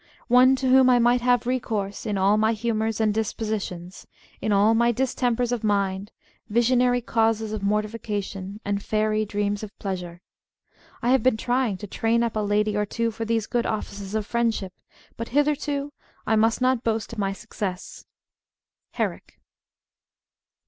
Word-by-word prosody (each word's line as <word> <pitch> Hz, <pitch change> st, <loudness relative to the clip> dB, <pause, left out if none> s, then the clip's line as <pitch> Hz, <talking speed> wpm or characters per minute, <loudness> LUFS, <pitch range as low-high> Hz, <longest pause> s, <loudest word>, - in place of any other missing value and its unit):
One 255 Hz, +2 st, +6 dB
to 265 Hz, 0 st, -2 dB
whom 260 Hz, 0 st, +6 dB
I 250 Hz, -, +6 dB
might 240 Hz, +1 st, +3 dB
have 245 Hz, -1 st, +2 dB
recourse 220 Hz, -5 st, -2 dB
in 205 Hz, -2 st, -1 dB
all 195 Hz, +2 st, +3 dB
my 220 Hz, +1 st, +2 dB
Humours 220 Hz, 0 st, -1 dB
and 215 Hz, -1 st, +2 dB
Dispositions: 205 Hz, -5 st, -4 dB, 0.3 s
in 215 Hz, -, -1 dB
all 205 Hz, +2 st, +4 dB
my 235 Hz, +1 st, +3 dB
Dis 260 Hz, +2 st, -1 dB
tempers 245 Hz, -1 st, 0 dB
of 240 Hz, -2 st, -2 dB
Mind, 200 Hz, -1 st, 0 dB, 0.4 s
visionary 245 Hz, +2 st, +3 dB
Causes 225 Hz, -2 st, 0 dB
of 215 Hz, -, -3 dB
Mortification, 205 Hz, -1 st, -3 dB
and 200 Hz, 0 st, -1 dB
Fairy 215 Hz, +1 st, 0 dB
Dreams 205 Hz, 0 st, -2 dB
of 215 Hz, -1 st, -9 dB
Pleasure. 180 Hz, -3 st, -5 dB, 0.8 s
I 240 Hz, -, +1 dB
have 265 Hz, -, +4 dB
been 255 Hz, -3 st, +2 dB
trying 245 Hz, -3 st, 0 dB
to 210 Hz, -, -7 dB
train 230 Hz, +3 st, 0 dB
up 230 Hz, -2 st, -2 dB
a -, -, 0 dB
Lady 210 Hz, 0 st, +1 dB
or 210 Hz, -, +1 dB
two 230 Hz, +2 st, -1 dB
for 225 Hz, +1 st, -5 dB
these 225 Hz, -1 st, 0 dB
good 240 Hz, 0 st, -1 dB
offices 205 Hz, -2 st, -4 dB
of 215 Hz, -1 st, -1 dB
Friendship, 225 Hz, -5 st, -1 dB, 0.4 s
but 230 Hz, -, -4 dB
hitherto 290 Hz, -1 st, 0 dB, 0.3 s
I 220 Hz, -, +2 dB
must 225 Hz, +2 st, +2 dB
not 255 Hz, -1 st, +2 dB
boast 225 Hz, 0 st, -1 dB
of 225 Hz, -, -6 dB
my 195 Hz, -1 st, 0 dB
success. 195 Hz, -1 st, -6 dB, 0.4 s
— -, -, -65 dB
Herrick. -, -, -4 dB
220 Hz, 165 wpm, -24 LUFS, 205-240 Hz, 0.8 s, One